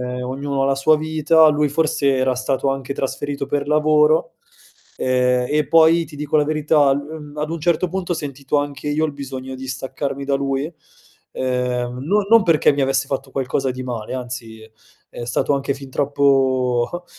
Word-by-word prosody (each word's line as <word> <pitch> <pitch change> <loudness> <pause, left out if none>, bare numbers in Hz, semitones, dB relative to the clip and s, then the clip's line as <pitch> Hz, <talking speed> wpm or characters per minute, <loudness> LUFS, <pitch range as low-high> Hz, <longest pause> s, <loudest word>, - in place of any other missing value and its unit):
ehm, 125 0 -4
ognuno 135 +2 -2
ha - - +2
la 135 0 +1
sua 155 +3 +4
vita, 155 +1 +3
lui 150 0 +2
forse 145 -2 +1
era 130 -1 +1
stato 135 +1 -1
anche 135 0 -4
trasferito 140 +1 -3
per 145 0 -2
lavoro, 150 +1 +3 0.6
ehm, 125 -1 +1
e 150 -1 +1
poi 165 +1 +5
ti 150 -1 -13
dico 150 +1 -1
la 150 - +3
verità 150 -2 +2
l 140 - 0 0.3
uhm, 150 - -11
ad 150 +1 -2
un 170 - -3
certo 170 +2 +1
punto, 185 -1 -3
ho - - 0
sentito 140 -1 -2
anche 145 -1 -4
io 150 +2 +1
il 150 - -2
bisogno 130 -2 -7
di 130 0 -8
staccarmi 135 +2 -4
da 140 0 +1
lui, 140 +3 -2 0.6
ehm, 125 -1 -2
non 200 +4 +1
non 230 -1 +6
perché 165 -4 +4
mi 140 - -2
avesse 135 0 +1
fatto 135 0 -4
qualcosa 135 0 -1
di 130 0 -5
male, 120 -1 -5
anzi, 120 -3 -7
è 110 - -15 0.4
è 120 - -6
stato 120 +4 0
anche 140 0 -1
fin 135 -1 -11
troppo 135 +1 +1
140 Hz, 190 wpm, -20 LUFS, 130-150 Hz, 0.6 s, non